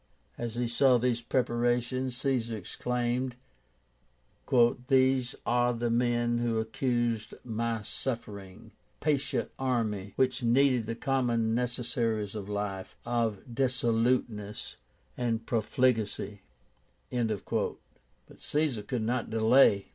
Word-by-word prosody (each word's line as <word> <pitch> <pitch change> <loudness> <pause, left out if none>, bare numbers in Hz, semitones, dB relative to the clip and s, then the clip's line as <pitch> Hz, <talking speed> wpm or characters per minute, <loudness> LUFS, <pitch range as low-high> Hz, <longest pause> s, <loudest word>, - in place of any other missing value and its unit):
As 120 -1 -4
he 120 0 0
saw 125 +2 +4
these 120 -1 0
preparations 120 +1 0
Caesar 125 -4 0
exclaimed, 125 +5 -2 1.5
"These 130 -1 +3
are 120 0 +2
the 120 0 -1
men 120 0 +2
who 120 -1 0
accused 115 0 -1
my 115 -1 -2
suffering, 105 -4 -6 0.3
patient 145 -3 0
army, 110 -7 -1
which 130 0 +1
needed 125 -1 +3
the 115 - -2
common 120 -4 +1
necessaries 115 -3 -1
of 105 -2 -6
life, 100 -2 -4
of 115 -4 0
dissoluteness 115 -4 0 0.4
and 115 -2 -1
profligacy." 110 -3 0 0.7
But 115 -5 -1 0.8
Caesar 145 -7 0
could 115 +2 -3
not 120 +1 -1
delay. 110 -2 +4
120 Hz, 100 wpm, -29 LUFS, 110-125 Hz, 1.5 s, saw